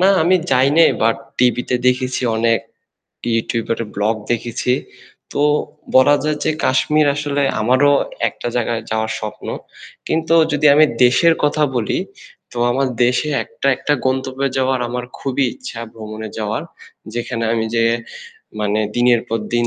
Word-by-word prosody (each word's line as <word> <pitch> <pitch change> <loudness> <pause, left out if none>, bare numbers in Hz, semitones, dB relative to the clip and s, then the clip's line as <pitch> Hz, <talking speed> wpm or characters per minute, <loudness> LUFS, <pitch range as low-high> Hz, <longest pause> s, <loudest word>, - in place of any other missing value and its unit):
না 190 - +5
আমি 180 +3 +4
যাই 135 0 +4
নাই 165 - +7
বাট 115 0 +3 0.2
টিভিতে 125 0 +1
দেখেছি 125 +1 +1
অনেক 115 0 +2 0.7
YouTuber 115 0 -1
এর 115 - -6
vlog 105 +3 0 0.2
দেখেছি। 120 +1 -1 0.6
তো - - -2 0.6
বলা 130 +3 +6
যায় 155 -1 0
যে - - +2
কাশ্মীর 150 +4 +2
আসলে 145 -1 -1 0.2
আমারও 130 +6 +4 0.4
একটা - - -6
জায়গায় 115 -1 -1
যাওয়ার 110 0 -1
স্বপ্ন। 110 0 -7 0.6
কিন্তু 165 +1 +1 0.2
যদি 150 +1 +2
আমি 155 +2 +7 0.2
দেশের 160 +7 +4
কথা 150 +1 +1
বলি, 110 -3 0 0.5
তো - - -12
আমার 130 +2 +1 0.2
দেশে 125 +5 +1 0.2
একটা - - -6
একটা 150 - -1
গন্তব্যে 130 +1 -1
যাওয়ার 130 -1 +1
আমার 125 0 -4
খুবই 135 0 -1
ইচ্ছা, 255 - -8
ভ্রমণে 110 0 -7
যাওয়ার। 110 +5 -2 0.5
যেখানে 120 -1 -3
আমি 115 -1 0
যেয়ে 115 0 +3 0.7
মানে 105 0 0 0.2
দিনের 120 -1 +4
পর 115 - -1 0.2
দিন 120 0 +2
125 Hz, 145 wpm, -18 LUFS, 115-140 Hz, 0.7 s, নাই